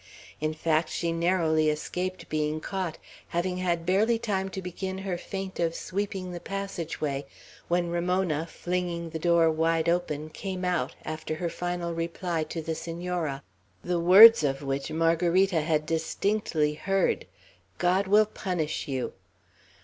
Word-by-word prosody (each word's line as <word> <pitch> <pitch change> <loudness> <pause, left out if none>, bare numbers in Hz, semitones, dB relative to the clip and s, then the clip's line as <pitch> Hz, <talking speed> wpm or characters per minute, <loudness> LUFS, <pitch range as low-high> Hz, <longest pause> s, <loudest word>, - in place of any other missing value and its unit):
In 155 +1 -1
fact, 155 0 +1
she 170 -1 -1
narrowly 165 -2 +2
escaped 180 +4 -3
being 155 0 -1
caught, 185 -1 -3 0.3
having 180 +1 -1
had 175 -2 -1
barely 210 +6 +3
time 195 -4 -1
to 190 - -5
begin 190 +1 -5
her 190 -1 -3
feint 190 +1 -6
of 165 -1 +1
sweeping 190 -1 -3
the 175 - -5
passage 195 -4 -5
way, 140 -2 -2 0.4
when 175 0 +1
Ramona, 175 -2 0
flinging 175 -1 -3
the 160 - -4
door 170 -1 +4
wide 165 +1 +1
open, 155 -3 0
came 185 +2 -4
out, 180 -2 0
after 155 0 -4
her 170 +2 -2
final 175 0 -3
reply 165 0 -2
to 165 0 -5
the 160 - -2
Senora, 165 -3 -3 0.4
the 175 -1 0
words 195 +4 +9
of 135 0 0
which 135 +1 -2
Margarita 170 +2 +2
had 155 -1 0
distinctly 165 -1 0
heard: 195 +5 0 0.5
"God 185 +2 +2
will 210 +2 +6
punish 180 -8 -3
you." 130 -3 -2
170 Hz, 145 wpm, -27 LUFS, 160-185 Hz, 0.5 s, words